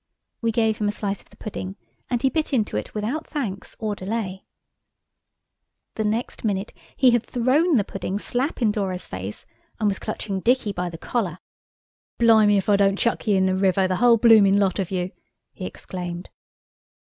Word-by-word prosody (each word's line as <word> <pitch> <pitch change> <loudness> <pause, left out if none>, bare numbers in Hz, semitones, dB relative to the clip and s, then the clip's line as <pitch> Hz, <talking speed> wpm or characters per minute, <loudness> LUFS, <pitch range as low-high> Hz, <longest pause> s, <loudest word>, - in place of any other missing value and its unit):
We 230 -1 +1
gave 220 -1 +1
him 210 - +1
a - - +2
slice 205 -1 -3
of - - -22
the - - -20
pudding, 95 - -6 0.3
and 245 0 -1
he 265 - +4
bit 315 -3 -1
into 220 - +1
it 105 - -4
without 235 +10 -2
thanks 215 -10 -4
or 215 -2 -2
delay. 195 -1 -4 1.5
The 220 - -2
next 220 +3 -2
minute 200 -2 -1 0.2
he 255 -2 +5
had 240 -1 +2
thrown 270 +9 +2
the 215 - +3
pudding 195 0 -4
slap 250 +5 -2
in 215 - +4
Dora's 190 -3 -2
face, 95 +2 -7 0.3
and 215 - +2
was 195 -2 0
clutching 205 -2 -3
Dicky 240 0 +2
by 180 -1 -2
the 165 - -8
collar. 185 -3 -2 0.8
"Blime 225 -3 +6
if 200 -2 +2
I 205 -1 +5
don't 195 0 +3
chuck 235 +1 0
ye 205 - +4
in 190 - +3
the 190 - +2
river, 190 0 +2
the 185 -1 0
whole 240 -1 +5
bloomin' 215 -4 +6
lot 200 -1 +1
of 190 - -1
you!" 185 -1 -2 0.4
he - - -6
exclaimed. 175 -1 -7
210 Hz, 185 wpm, -23 LUFS, 190-230 Hz, 1.5 s, Blime